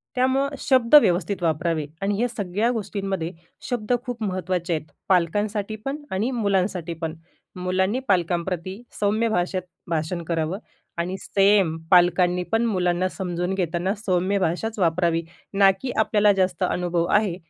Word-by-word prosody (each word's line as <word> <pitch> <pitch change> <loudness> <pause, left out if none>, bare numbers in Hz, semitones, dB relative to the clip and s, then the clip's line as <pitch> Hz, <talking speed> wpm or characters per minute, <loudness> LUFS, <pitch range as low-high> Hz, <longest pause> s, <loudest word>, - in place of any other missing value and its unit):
त्यामुळं 260 +2 +2
शब्द 255 -2 +2
व्यवस्थित 180 +1 0
वापरावे 160 -1 0 0.2
आणि 200 +1 0
या 245 - +2
सगळ्या 210 0 -1
गोष्टींमध्ये 195 -6 -3 0.4
शब्द 240 -2 -2
खूप 245 -2 -5
महत्त्वाचे 185 -2 -2
आहेत. 155 -1 -4 0.2
पालकांसाठी 205 +4 +1
पण 275 +1 -2
आणि 205 +7 0
मुलांसाठी 195 -7 0
पण. 160 -1 -4 0.4
मुलांनी 190 +5 0
पालकांप्रती 180 +2 -1 0.2
सौम्य 215 +3 +2
भाषेत 185 -2 0 0.3
भाषण 165 +2 -1
करावं 165 +2 -1 0.4
आणि 180 +3 -2
सेम 195 -4 +3
पालकांनी 180 0 +4
पण 225 +1 +3
मुलांना 180 -3 +1
समजून 180 -1 -3
घेताना 180 +1 -1
सौम्य 185 +1 +1
भाषाच 195 +5 -1
वापरावी. 170 -2 +2 0.3
ना 195 -1 +6
की 260 -2 -3
आपल्याला 210 -1 +4
जास्त 185 -2 0
अनुभव 175 -1 0
आहे 205 -4 +2
185 Hz, 135 wpm, -24 LUFS, 175-210 Hz, 0.4 s, ना